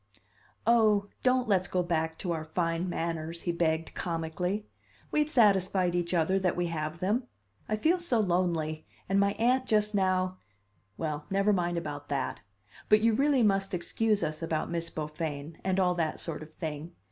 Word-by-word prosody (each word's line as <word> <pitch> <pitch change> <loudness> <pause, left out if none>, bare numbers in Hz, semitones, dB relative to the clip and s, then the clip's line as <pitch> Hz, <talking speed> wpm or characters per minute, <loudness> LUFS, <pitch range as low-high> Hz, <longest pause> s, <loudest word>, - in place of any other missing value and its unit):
"Oh, 215 -3 +4
don't 255 -1 +2
let's 185 -4 +2
go 180 0 0
back 160 -2 -1
to 180 - -3
our 160 -2 -2
fine 165 +2 -1
manners!" 165 -1 -3
he 175 - 0
begged 165 -1 0
comically. 175 +4 -2 0.5
"We've 300 0 +2
satisfied 190 - +3
each 175 -1 -1
other 175 +4 +2
that 185 -2 +1
we 175 - 0
have 155 0 -3
them! 215 +8 0 0.4
I 215 - +2
feel 325 +11 +2
so 305 -10 +1
lonely; 170 -5 0 0.2
and 195 +1 +2
my 200 0 +3
aunt 255 +4 +2
just 210 -1 +2
now 185 -1 +1 0.6
well, 150 -2 -3
never 195 +2 +3
mind 175 -2 0
about 145 -3 -5
that. 140 -2 -2 0.5
But 215 0 +6
you 225 0 +4
really 275 +1 +3
must 195 -2 +2
excuse 210 +4 0
us 155 0 -2
about 165 -1 -2
Miss 170 -1 -1
Beaufain, 150 -1 -5
and 190 0 +1
all 180 -1 +3
that 165 -3 -1
sort 165 -3 -4
of 155 0 -10
thing. 160 +1 -6
180 Hz, 170 wpm, -29 LUFS, 160-205 Hz, 0.6 s, But